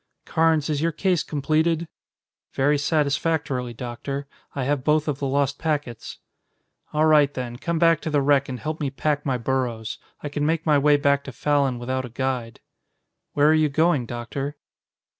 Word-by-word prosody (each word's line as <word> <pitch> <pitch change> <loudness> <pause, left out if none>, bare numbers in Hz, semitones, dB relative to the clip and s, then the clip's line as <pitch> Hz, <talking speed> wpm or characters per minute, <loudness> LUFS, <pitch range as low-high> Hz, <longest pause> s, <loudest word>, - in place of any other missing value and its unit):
Carnes, 160 -2 +2
is 150 -2 -1
your 165 +1 +1
case 180 0 +1
completed?" 160 +3 0 0.7
"Very 145 +2 +2
satisfactorily, 145 -4 0
Doctor. 130 +4 -5 0.3
I 135 - -1
have 140 0 0
both 150 +1 +2
of 145 -2 -2
the 140 - -1
lost 140 +1 0
packets." 145 -7 -3 0.7
"All 155 +1 +2
right, 150 -3 +5
then, 125 -3 -5
come 170 +5 -2
back 165 -1 +4
to 160 - -3
the 145 -2 +2
wreck 140 -1 +3
and 125 -1 -5
help 155 +4 -4
me 140 - 0
pack 145 +1 -1
my 130 -2 +1
burros. 120 -3 -2 0.2
I - - -2
can 145 0 -2
make 160 +1 0
my 150 -3 +4
way 145 +1 +4
back 140 -1 +2
to 135 - -6
Fallon 140 +1 +1
without 130 +2 -2
a 125 - -7
guide." 125 -1 -3 0.7
"Where 145 0 +4
are - - +6
you 155 -1 +3
going, 155 -3 +2
Doctor?" 135 +5 -5
145 Hz, 180 wpm, -24 LUFS, 130-155 Hz, 0.7 s, are